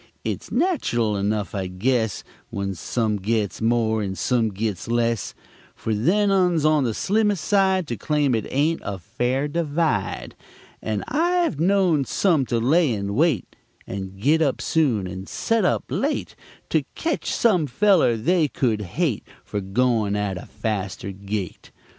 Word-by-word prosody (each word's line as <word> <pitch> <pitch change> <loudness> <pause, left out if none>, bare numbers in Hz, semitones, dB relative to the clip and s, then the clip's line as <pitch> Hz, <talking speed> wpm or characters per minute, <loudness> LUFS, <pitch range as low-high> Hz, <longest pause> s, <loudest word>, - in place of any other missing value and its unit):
Its - - -4
natchurl 240 - +1
enugh, 100 0 -1
I 95 -2 -2
guess, 110 +3 0 0.3
When 100 -1 -3
some 105 +4 -1
gits 105 +1 -1
more 110 -1 +2
and 95 -2 -3
some 120 -3 +1
gits 105 -1 -3
less, 115 -2 0 0.4
Fer 110 - -2
them 195 - +2
uns 180 -5 +2
on 155 -3 +3
the 115 - 0
slimmest 205 -2 +1
side 190 -3 +3
To 120 - -2
claim 145 -1 +1
it 110 -3 -1
ain't 155 +5 +1
a 100 - -4
fare 125 - -1
divide; 155 - -1 0.5
And 110 -2 -2
I've 345 - +1
knowed 175 -5 +3
some 160 -10 +2
to 120 - 0
lay 145 +6 +3
and 100 -1 -3
wait, 145 - +1 0.3
And 95 0 -6
git 150 +9 +3
up 140 -4 +1
soon, 130 -12 +1
and 95 +1 -7
set 230 -1 0
up - - +1
late, - - -2 0.4
To - - +2
ketch 330 -1 -2
some 185 -10 +2
feller 165 - +3
they 165 +7 +2
could 115 -6 0
hate 115 - -1 0.2
Fer 105 - -3
goin' 110 +1 +1
at 105 -2 -1
a 90 - -8
faster 105 -2 -3
gait. 100 -1 -5
120 Hz, 155 wpm, -23 LUFS, 105-165 Hz, 0.5 s, on